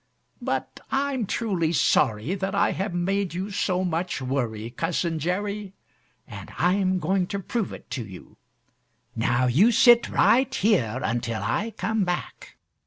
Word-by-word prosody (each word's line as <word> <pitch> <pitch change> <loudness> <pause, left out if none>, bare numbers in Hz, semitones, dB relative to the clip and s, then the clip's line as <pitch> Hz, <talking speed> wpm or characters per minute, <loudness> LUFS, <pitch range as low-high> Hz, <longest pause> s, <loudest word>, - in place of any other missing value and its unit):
But - - -3
I'm 270 -5 -1
truly 185 -9 0
sorry 130 - +2
that 195 0 -2
I - - +3
have 195 +1 -3
made 180 +1 -1
you 190 +3 -3
so 185 -2 0
much 175 -1 -2
worry, 120 -4 -3
Cousin 165 +3 -1
Jerry, 200 +4 -3 0.5
and - - -9
I'm 185 +1 +2
going 180 +2 0
to 200 - -3
prove 210 +2 -3
it - - -10
to 125 - -3
you. 95 -4 -12 0.8
Now 120 +2 +1
you 160 - +4
sit 240 0 +6
right 255 +2 +3
here 130 - +1
until 115 -3 -2
I 210 - -2
come 220 -2 0
back." 180 -1 -5
180 Hz, 145 wpm, -25 LUFS, 135-200 Hz, 0.8 s, sit